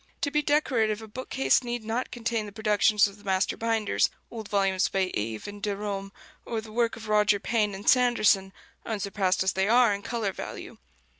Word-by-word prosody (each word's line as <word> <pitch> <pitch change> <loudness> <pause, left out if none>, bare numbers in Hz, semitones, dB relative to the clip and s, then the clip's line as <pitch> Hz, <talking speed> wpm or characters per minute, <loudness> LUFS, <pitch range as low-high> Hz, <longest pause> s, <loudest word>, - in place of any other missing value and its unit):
To 285 - 0
be 300 0 +2
decorative, 235 -8 +1
a - - -9
bookcase 210 - +1
need 240 -2 -4
not 230 +3 -2
contain 230 -2 -2
the - - -9
productions 210 0 +3
of 200 +1 -12
the - - -18
master 190 -1 0
binders, 225 -2 +1 0.2
old 220 -3 -7
volumes 195 -2 +1
by 190 -1 0
Eve 110 +1 -3
and 205 0 -9
Derôme, 200 -1 -3 0.3
or 230 - -3
the 220 0 -10
work 230 +1 0
of 225 -1 -10
Roger 210 -1 +3
Payne 210 -2 0
and 195 - -10
Sanderson, 215 -6 +4 0.3
unsurpassed 200 -3 -1
as 190 - +1
they 190 +1 +1
are 240 -2 +5
in 200 - -4
color 225 -2 -2
value. - - -8
210 Hz, 190 wpm, -27 LUFS, 200-230 Hz, 0.3 s, are